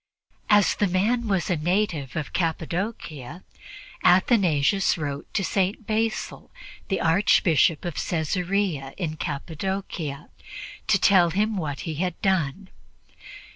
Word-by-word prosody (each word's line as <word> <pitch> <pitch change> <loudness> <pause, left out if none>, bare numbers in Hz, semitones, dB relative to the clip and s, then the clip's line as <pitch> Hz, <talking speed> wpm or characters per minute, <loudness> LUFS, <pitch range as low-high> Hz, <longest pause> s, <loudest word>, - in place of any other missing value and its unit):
As 205 -1 +5
the 205 - +1
man 220 +6 +1
was 195 -4 0
a - - +3
native 170 -3 -1
of 155 -3 -4
Cappadocia, 165 - -3 0.6
Athanasius 185 - +3
wrote 145 -3 -5
to 195 - +1
St. 195 +3 -1
Basil, 220 +1 -2 0.4
the 195 - -1
Archbishop 165 -3 +3
of 175 - -3
Caesarea 175 -3 -1
in 160 -5 -3
Cappadocia, 160 0 -4 0.6
to - - +4
tell 180 -3 +5
him 210 +5 0
what 150 -7 -3
he 160 - -4
had 180 -2 -2
done. 185 -1 0
180 Hz, 115 wpm, -25 LUFS, 155-195 Hz, 0.6 s, As